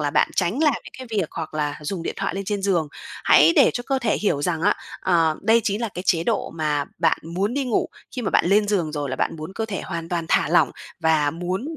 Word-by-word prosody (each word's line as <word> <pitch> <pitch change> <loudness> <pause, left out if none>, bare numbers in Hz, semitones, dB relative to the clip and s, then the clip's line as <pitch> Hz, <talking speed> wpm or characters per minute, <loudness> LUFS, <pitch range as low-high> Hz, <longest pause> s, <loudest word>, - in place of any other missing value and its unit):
là 145 -1 0
bạn - - +2
tránh 195 - +1
làm 295 -5 +4
những - - -12
cái 260 - -7
việc 175 -6 0
hoặc 160 -2 -6
là 150 -1 -2
dùng 165 +4 -4
điện - - -3
thoại - - -2
lên 195 - -3
trên 200 0 -2
giường. 175 -6 +1 0.4
Hãy 155 +3 +6
để - - +7
cho 245 - -2
cơ 270 -1 +1
thể 230 -4 +1
hiểu 145 -9 0
rằng 165 0 -1
á, 205 - +4 0.3
ờ, 165 -4 +2
đây 230 +1 +4
chí 200 +1 0
là 230 0 -2
cái 180 - -4
chế 170 -2 +2
độ - - -1
mà 150 -3 -1
bạn 165 -2 +2
muốn 185 +8 -2
đi 280 -1 0
ngủ. 245 -4 0 0.3
Khi 250 - -2
mà 195 - -1
bạn - - +3
lên 205 +3 +3
giường 175 -7 0
rồi 145 -3 -3
là 130 - -3
bạn - - -1
muốn 155 +4 -7
cơ 225 - -2
thể 200 -3 -4
hoàn 165 -2 -5
toàn 170 -1 -2
thả - - +3
lỏng - - +4 0.3
và 155 -2 +3
muốn 185 - -4
175 Hz, 265 wpm, -23 LUFS, 160-210 Hz, 0.4 s, để